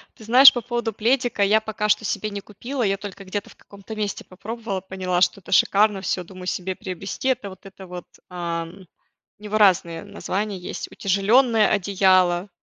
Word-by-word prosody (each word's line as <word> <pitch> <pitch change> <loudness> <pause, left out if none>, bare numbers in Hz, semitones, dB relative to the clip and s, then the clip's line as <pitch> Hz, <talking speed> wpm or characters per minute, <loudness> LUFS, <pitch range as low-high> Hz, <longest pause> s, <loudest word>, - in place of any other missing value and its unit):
Ты - - -15
знаешь, 255 +5 +8
по 245 - -3
поводу 235 -1 -3
пледика- 240 0 +1
я 210 +2 +4
пока 215 -1 -3
что 210 +1 +2
себе 215 - -2
не 200 -1 -6
купила, 240 +7 -5
я 195 -2 +1
только 195 0 -9
где-то 200 +2 -5
в - - -17
каком-то 200 +2 -12
месте 210 -2 -3
попробовала, 205 +1 -6
поняла, 185 -1 -2
что 200 - +2
это - - -13
шикарно, 200 +1 +3
всё, 185 -1 -2
думаю 180 +1 -11
себе 185 0 -3
приобрести 195 +8 -4
это, 225 -6 -1
вот 190 0 -14
это 195 -1 -12
вот, 180 -1 -8 0.2
ам. 170 +1 -5 0.5
У - - -19
него 210 0 -2
разные 175 -5 +3
названия 205 0 -4
есть: 180 - -7
утяжеленное 215 +4 +3
одеяло, 185 -2 +2
200 Hz, 180 wpm, -23 LUFS, 185-215 Hz, 0.5 s, знаешь